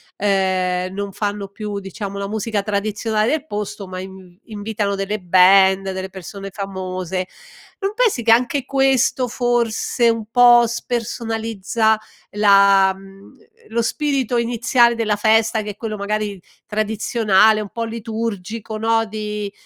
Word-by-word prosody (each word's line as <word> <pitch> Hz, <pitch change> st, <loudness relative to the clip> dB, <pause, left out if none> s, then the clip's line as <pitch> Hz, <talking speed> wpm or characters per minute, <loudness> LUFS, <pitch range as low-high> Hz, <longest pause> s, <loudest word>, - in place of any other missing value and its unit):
ehm, 185 Hz, -2 st, 0 dB
non 200 Hz, 0 st, -4 dB
fanno 205 Hz, 0 st, -3 dB
più, 205 Hz, 0 st, -5 dB
diciamo, 200 Hz, +1 st, -7 dB
la 200 Hz, 0 st, -4 dB
musica 215 Hz, -1 st, -2 dB
tradizionale 215 Hz, +2 st, -1 dB
del 310 Hz, -1 st, -1 dB
posto, 210 Hz, -4 st, -5 dB
ma 185 Hz, 0 st, -6 dB
in 190 Hz, -1 st, -11 dB
invitano 210 Hz, -2 st, -3 dB
delle 195 Hz, +2 st, -3 dB
band, 190 Hz, +1 st, +5 dB
delle 190 Hz, 0 st, -5 dB
persone 195 Hz, +1 st, -8 dB
famose, 185 Hz, -2 st, -4 dB, 0.5 s
non 395 Hz, 0 st, -2 dB
pensi 440 Hz, -, +1 dB
che 225 Hz, -, +4 dB
anche 250 Hz, +4 st, +2 dB
questo 270 Hz, -2 st, +2 dB
forse 240 Hz, -1 st, +1 dB
un 230 Hz, -1 st, -1 dB
po' 240 Hz, -1 st, +7 dB
spersonalizza 225 Hz, -2 st, -1 dB, 0.3 s
la 200 Hz, -2 st, +5 dB
mhmm, 195 Hz, 0 st, -15 dB
uhm, -, -, -17 dB, 0.3 s
lo 235 Hz, +1 st, 0 dB
spirito 265 Hz, 0 st, -1 dB
iniziale 235 Hz, 0 st, +2 dB
della 215 Hz, -2 st, 0 dB
festa 220 Hz, +1 st, +2 dB
che 210 Hz, 0 st, -5 dB
è -, -, -13 dB
quello 215 Hz, 0 st, -5 dB
magari 205 Hz, -1 st, -3 dB, 0.2 s
tradizionale, 215 Hz, 0 st, +2 dB
un 205 Hz, -, -7 dB
po' 230 Hz, -, -4 dB
liturgico, 225 Hz, -1 st, -5 dB
no, 225 Hz, +1 st, +2 dB
di 210 Hz, -1 st, -5 dB
210 Hz, 135 wpm, -20 LUFS, 195-230 Hz, 0.5 s, po